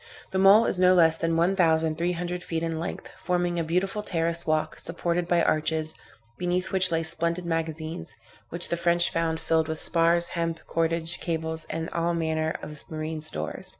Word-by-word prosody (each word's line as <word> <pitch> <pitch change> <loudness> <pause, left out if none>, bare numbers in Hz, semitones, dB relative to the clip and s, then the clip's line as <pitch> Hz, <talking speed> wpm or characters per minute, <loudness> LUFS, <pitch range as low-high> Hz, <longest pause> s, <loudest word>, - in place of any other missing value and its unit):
The 190 - 0
mole 200 +4 +7
is 180 - 0
no 185 0 +5
less 165 -2 +5
than 165 0 0
one 175 +4 +2
thousand 160 -3 +2
three 175 +1 0
hundred 175 +1 -4
feet 165 -2 -3
in 165 -1 -2
length, 170 - -5
forming 175 -1 -1
a - - 0
beautiful 185 +5 -1
terrace 170 -3 0
walk, 155 0 0
supported 170 +1 -2
by 175 -1 +2
arches, 155 0 0 0.5
beneath 180 +1 -1
which 185 -2 +1
lay 165 0 +1
splendid 170 +2 +1
magazines, 165 0 -3 0.3
which 170 +1 +2
the 170 - -1
French 170 0 +2
found 165 -1 -1
filled 160 -1 +1
with 160 0 -4
spars, 170 0 +2
hemp, 165 -1 -2
cordage, 165 0 0
cables, 160 -1 -4
and 160 0 -3
all 170 0 0
manner 160 -1 -1
of 150 -1 -7
marine 155 0 -4
stores. 80 - -3
165 Hz, 185 wpm, -26 LUFS, 160-175 Hz, 0.5 s, mole